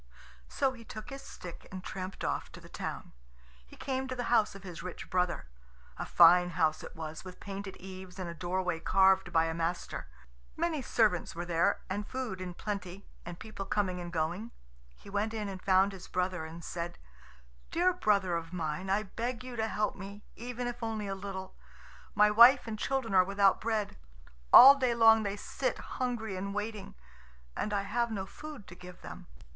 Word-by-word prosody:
So 265 - 0
he 235 -2 -12
took 215 +1 -9
his 275 0 -7
stick 175 -2 -10
and 185 -1 -7
tramped 185 0 -6
off - - -2
to - - -9
the - - -14
town. - - -6 0.5
He - - -14
came 265 -1 -3
to 260 - -4
the 245 - -2
house 220 -4 +3
of 195 - -11
his 180 -3 -8
rich 180 0 -8
brother. 180 -1 0 0.5
A - - -5
fine 175 +1 +7
house 160 -2 +1
it - - -10
was, 160 -1 -6
with 185 -1 -10
painted 195 -1 -7
eaves 185 0 -10
and 185 -2 -4
a 170 - -5
doorway 180 0 -2
carved 190 +1 +4
by 165 -1 +4
a 165 - -2
master. 165 - -3 0.5
Many 325 -3 0
servants 215 -10 +1
were 175 +1 -4
there 170 -1 +1
and 205 +2 -3
food 250 -8 -4
in 180 -1 -6
plenty, 200 -2 -5 0.2
and 175 -1 -6
people 215 -1 -7
coming 195 -3 -1
and 175 -1 -6
going. 170 +7 -2 0.5
He - - -17
went 205 +3 -1
in 210 -2 -2
and 190 -1 -6
found 190 +1 +4
his 190 -2 -10
brother, 180 -2 -1
and 165 +1 -9
said, 170 +1 -5 0.7
"Dear 360 +2 +2
brother 200 - +2
of 165 0 -4
mine, 165 +1 -3
I 200 +2 +2
beg 235 +4 -4
you 250 -1 -7
help 220 -2 -1
me, 200 +1 -9
even 245 +1 -5
if 245 0 -4
only 220 -2 -2
a 195 - -2
little. 190 -1 -6 0.6
My 210 0 +6
wife 240 +5 +8
and 220 -2 -5
children 265 -5 -1
are 185 -1 +7
without 195 +1 +3
bread. 220 -2 -1 0.5
All 270 +3 +12
day 255 -4 +1
long 225 -1 +7
they 200 -1 -2
sit - - -2
hungry 235 -5 -3
and 200 +2 -4
waiting, 210 -1 -4 0.6
and 210 - -2
I 200 -1 0
have 235 +4 0
no 200 -4 -3
food 295 +1 -10
to - - -12
give 180 0 -12
them." - - -9
195 Hz, 190 wpm, -31 LUFS, 180-225 Hz, 0.7 s, All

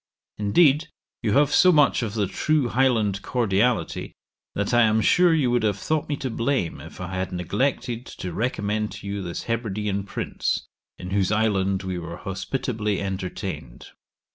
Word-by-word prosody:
Indeed, 145 +9 +4 0.3
you 110 -3 0
have 145 +2 +4
so 185 +4 +6
much 150 -6 +4
of 110 -2 -3
the 105 -2 +1
true 145 +6 +1
Highland 115 -6 +2
cordiality, 120 0 0 0.4
that 100 +4 -1
I 120 - +6
am 110 -1 +4
sure 175 - +4
you 145 -7 +2
would 120 0 +2
have 105 -2 +1
thought 155 +9 -1
me 145 - 0
to 135 -3 -4
blame 115 - -1
if 80 - -11
I 90 0 -5
had 95 +1 -2
neglected 115 +6 -1
to 90 -2 -6
recommend 105 -1 -1
to - - -10
you 100 0 -3
this 85 -2 -5
Hebridean 105 -3 -2
prince, - - -2 0.3
in 90 +1 -7
whose 100 0 +1
island 100 -3 +1
we 95 -1 -3
were 85 0 -7
hospitably 105 +2 -2
entertained. 95 -10 -5
105 Hz, 165 wpm, -24 LUFS, 95-125 Hz, 0.4 s, so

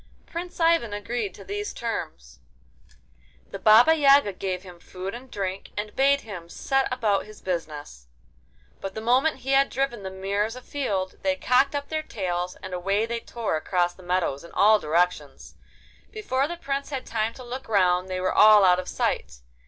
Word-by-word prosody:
Prince 350 +2 -7
Ivan 330 -10 +3
agreed 205 -1 -3
to - - -11
these 410 +1 -4
terms. 145 - -5 1.1
The - - -6
Baba 225 +9 +7
Yaga 280 -8 +5
gave 185 0 -4
him 180 -2 -12
food 185 +2 -7
and 250 +2 -9
drink, 195 -2 -4
and 210 0 -4
bade 275 +1 +3
him 180 -6 -9
set 270 +8 0
about 215 -6 0
his 215 - -13
business. 150 - -5 0.7
But 195 0 -6
the - - -3
moment 260 +5 +2
he 270 - -1
had 275 0 +4
driven 265 -4 -2
the 190 - -5
mares 200 +4 -2
afield, 215 -8 -3
they 285 -1 +1
cocked 275 +1 +2
up 285 0 -4
their 315 0 -1
tails, 180 -9 -3
and 190 -1 -7
away 195 +4 0
they 235 0 -3
tore 230 -7 -3
across 175 +2 0
the - - -16
meadows 175 -6 -1
in 170 - -13
all 215 +1 +5
directions. 160 -3 -1 0.6
Before 280 -11 -1
the 345 +2 -6
Prince 275 -3 -3
had 270 -3 -4
time 225 0 -2
to 255 - -10
look 250 +2 -7
round 185 -3 +2
they 185 0 -2
were 185 0 0
all 210 -2 +7
out 180 -1 +5
of 185 - -6
sight. - - -2
210 Hz, 180 wpm, -25 LUFS, 185-270 Hz, 1.1 s, Baba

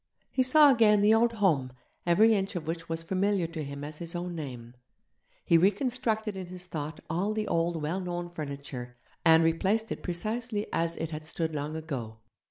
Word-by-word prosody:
He 260 - +1
saw 285 +3 +7
again 215 -4 +5
the 210 +1 +6
old 230 +1 +3
home, 155 - +1 0.3
every 215 +6 +5
inch 195 -2 -1
of 170 -3 -3
which 165 +1 -4
was 165 0 -2
familiar 190 +1 +1
to 165 -1 -5
him 140 0 -7
as 150 +1 -6
his 170 0 -5
own 175 0 -3
name; 125 -7 -7 0.7
he 170 - +5
reconstructed 220 +2 0
in 185 -2 -6
his 180 0 -8
thought 155 -3 -5
all 190 +7 -1
the 215 -1 -1
old 165 -1 0
well 165 +6 -1
known 175 -1 -4
furniture, 140 -6 -7 0.3
and 165 -1 +6
replaced 195 +7 +1
it - - -4
precisely 215 +4 -2
as 165 0 0
it 165 0 -4
had 155 0 -6
stood 160 0 -2
long 150 +1 -3
ago. 135 -9 -5
170 Hz, 185 wpm, -29 LUFS, 155-205 Hz, 0.7 s, saw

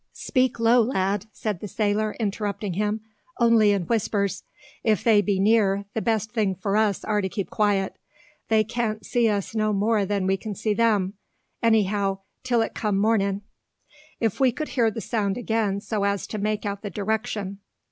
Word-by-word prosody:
"Speak 255 -2 0
low, 230 +2 +5
lad!" 205 -3 0
said 210 -5 -3
the 210 - -6
sailor, 215 0 0
interrupting 205 -2 -2
him, 210 +3 -1 0.4
"only 230 -3 +5
in 200 -3 +2
whispers. 200 -1 0 0.4
If 215 -4 +2
they 220 -3 +5
be 200 -2 0
near, 200 -1 +3
the 220 - -1
best 220 -1 0
thing 210 -5 0
for 195 +2 -2
us 215 -2 +2
are 210 -1 +1
to 190 - -2
keep 200 0 -4
quiet. 200 -2 0 0.5
They 220 -1 +4
can't 220 -2 -3
see 235 +1 +2
us 205 0 -2
no 215 -1 +1
more 210 +1 +2
than 200 -1 0
we 190 +1 +2
can 210 0 -6 0.2
them; 210 -4 +2 0.5
anyhow, 205 -3 +2 0.2
till 240 -3 +2
it - - -5
come 210 -3 -1
mornin'. 200 -1 +1 0.8
If 225 0 0
we 260 -2 +4
could 305 +6 -5
hear 235 -4 +2
the 225 +1 -5
sound 205 -5 -1
again 220 -4 0
so 210 -1 -2
as 200 -1 0
to 215 - -5
make 210 +1 -1
out 200 -1 -3
the 205 - -5
direction. 210 -1 -3
210 Hz, 175 wpm, -25 LUFS, 200-225 Hz, 0.8 s, low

